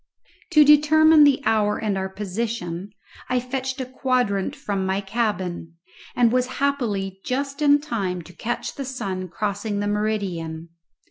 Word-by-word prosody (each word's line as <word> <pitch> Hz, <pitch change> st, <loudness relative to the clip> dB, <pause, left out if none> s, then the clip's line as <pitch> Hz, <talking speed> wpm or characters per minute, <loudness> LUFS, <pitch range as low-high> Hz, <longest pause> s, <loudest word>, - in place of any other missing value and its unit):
To 305 Hz, -1 st, +8 dB
determine 305 Hz, +1 st, +6 dB
the 280 Hz, -1 st, +3 dB
hour 210 Hz, -1 st, +2 dB
and 210 Hz, -3 st, -1 dB
our 190 Hz, 0 st, -2 dB
position 195 Hz, -2 st, -4 dB, 0.4 s
I 250 Hz, -, +2 dB
fetched 260 Hz, +1 st, -4 dB
a 260 Hz, -, -2 dB
quadrant 255 Hz, -3 st, 0 dB
from 205 Hz, -9 st, -3 dB
my 190 Hz, +1 st, 0 dB
cabin, 190 Hz, -6 st, -3 dB, 0.4 s
and 240 Hz, -2 st, +4 dB
was 250 Hz, 0 st, +2 dB
happily 215 Hz, -9 st, -1 dB
just 275 Hz, +3 st, -3 dB
in 290 Hz, 0 st, +5 dB
time 195 Hz, -, -3 dB
to 175 Hz, -, -14 dB
catch 240 Hz, +7 st, -4 dB
the 275 Hz, -, -5 dB
sun 195 Hz, -8 st, -4 dB
crossing 205 Hz, +3 st, -3 dB
the 205 Hz, -, -1 dB
meridian. 190 Hz, -6 st, -2 dB
215 Hz, 145 wpm, -23 LUFS, 190-260 Hz, 0.4 s, To